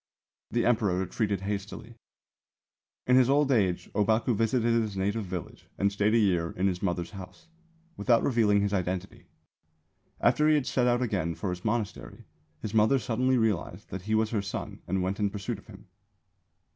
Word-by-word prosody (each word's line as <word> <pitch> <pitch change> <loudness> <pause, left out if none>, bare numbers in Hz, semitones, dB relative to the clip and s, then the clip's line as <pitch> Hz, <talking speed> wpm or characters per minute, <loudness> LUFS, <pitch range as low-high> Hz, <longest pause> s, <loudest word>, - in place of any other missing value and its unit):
The 120 - 0
Emperor 110 -6 +2
retreated 100 +1 -1
hastily." 100 +3 -5 1.1
In 125 0 +5
his 130 -1 +5
old 140 0 +3
age 95 -8 +1
Ōbaku 110 +3 +2
visited 115 +2 +1
his 105 -3 -4
native 100 +3 -1
village 90 -3 -7
and 100 0 +2
stayed 105 +2 +1
a - - +5
year 90 -6 +1
in 95 - 0
his 90 -2 0
mother's 90 -3 -2
house, 90 - -11 0.5
without 120 -3 +3
revealing 110 -5 +3
his 100 0 -1
identity. 95 0 -3 0.9
After 150 - +3
he 155 - +5
had 145 -4 +1
set 125 -1 +1
out 120 +1 +2
again 90 -8 -1
for 95 +1 -3
his 90 0 -6
monastery, 110 -1 -3 0.4
his 110 - -4
mother 110 +5 +4
suddenly 125 +2 +1
realised 105 -4 -1
that 95 - -5
he 110 - +3
was 110 0 +1
her 110 -3 0
son 100 0 -6
and 95 0 0
went 95 +3 -2
in 105 -1 +1
pursuit 105 +2 -5
of - - -20
him. 100 -1 -13
105 Hz, 175 wpm, -28 LUFS, 95-115 Hz, 1.1 s, In